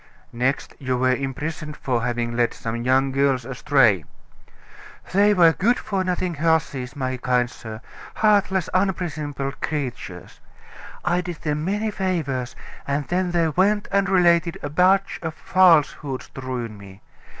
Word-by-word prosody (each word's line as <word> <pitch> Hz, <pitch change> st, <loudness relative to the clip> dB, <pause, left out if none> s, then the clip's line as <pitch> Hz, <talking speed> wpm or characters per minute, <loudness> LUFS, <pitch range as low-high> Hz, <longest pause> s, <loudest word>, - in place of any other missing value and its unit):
"Next 125 Hz, +3 st, -1 dB
you 130 Hz, -3 st, -1 dB
were 130 Hz, 0 st, +2 dB
imprisoned 150 Hz, +3 st, -4 dB
for 125 Hz, -3 st, -1 dB
having 120 Hz, 0 st, -2 dB
led 120 Hz, 0 st, +1 dB
some 115 Hz, 0 st, -4 dB
young 130 Hz, +2 st, +2 dB
girls 135 Hz, -2 st, +1 dB
astray." 125 Hz, -, +3 dB, 1.1 s
"They 205 Hz, +2 st, +5 dB
were 170 Hz, -3 st, +6 dB
good 235 Hz, +9 st, +2 dB
for 195 Hz, -2 st, -2 dB
nothing 180 Hz, -1 st, -1 dB
hussies, 155 Hz, -5 st, 0 dB
my 130 Hz, -2 st, -2 dB
kind 125 Hz, -1 st, +1 dB
sir, 110 Hz, -2 st, -9 dB, 0.3 s
heartless, 200 Hz, -4 st, +2 dB
unprincipled 155 Hz, -7 st, -2 dB
creatures. 125 Hz, -, -5 dB, 0.7 s
I 175 Hz, 0 st, +2 dB
did 175 Hz, -2 st, -7 dB
them 150 Hz, -1 st, -1 dB
many 210 Hz, +5 st, -1 dB
favors, 160 Hz, -11 st, -2 dB, 0.3 s
and 140 Hz, 0 st, -1 dB
then 180 Hz, +1 st, 0 dB
they 170 Hz, -2 st, +1 dB
went 200 Hz, +6 st, +1 dB
and 200 Hz, 0 st, +2 dB
related 175 Hz, -2 st, +3 dB
a 145 Hz, -, -4 dB
batch 190 Hz, +4 st, +3 dB
of 160 Hz, -1 st, -4 dB
falsehoods 155 Hz, -6 st, +2 dB
to 135 Hz, -, -9 dB
ruin 120 Hz, -5 st, -5 dB
me. 100 Hz, 0 st, -14 dB
150 Hz, 140 wpm, -23 LUFS, 130-180 Hz, 1.1 s, were